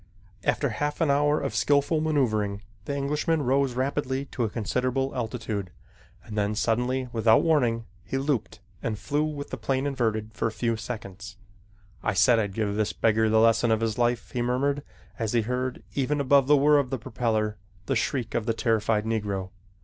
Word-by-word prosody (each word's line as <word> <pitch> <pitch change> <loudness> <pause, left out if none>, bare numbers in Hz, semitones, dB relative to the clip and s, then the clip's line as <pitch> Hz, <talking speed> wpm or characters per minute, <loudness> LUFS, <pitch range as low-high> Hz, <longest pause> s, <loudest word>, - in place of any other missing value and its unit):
After 145 - +1
half 145 +6 -2
an 160 -4 +3
hour 145 +2 +3
of 140 - -3
skillful 145 +2 +2
maneuvering, 110 -10 0 0.2
the 140 +3 -2
Englishman 150 +3 0
rose 135 0 +1
rapidly 135 +1 -1
to 120 - -1
a 110 - 0
considerable 125 +5 -1
altitude, 110 -5 -3 0.5
and 105 - -8
then, 105 0 0
suddenly, 125 +4 0
without 115 -1 +4
warning, 120 -8 +2 0.2
he 105 +9 -3
looped 135 -6 -2 0.2
and 110 -2 -2
flew 145 +6 -1
with 150 -2 -4
the - - -3
plane 135 0 -1
inverted 110 -6 -1
for 110 - -1
a - - -2
few 115 +1 -1
seconds. 100 -3 -7 0.6
"I 100 - -1
said 115 +3 +5
I'd 100 -3 -2
give 105 -2 0
this 105 0 0
beggar 110 0 +2
the 110 0 +4
lesson 115 +1 +4
of 110 0 +2
his 115 0 -1
life," 120 -1 0
he 125 - -2
murmured 135 +4 0 0.4
as 110 -1 -1
he 120 - +3
heard, 125 +2 -3
even 145 +2 0
above 140 -1 +4
the 150 0 +6
whir 145 +1 +5
of 135 -3 -1
the 135 - -2
propeller, 110 -2 -1 0.3
the - - 0
shriek 120 -5 -1
of 115 0 -1
the 115 - +1
terrified 110 -2 +1
Negro. 100 -4 -2
120 Hz, 185 wpm, -26 LUFS, 110-140 Hz, 0.6 s, the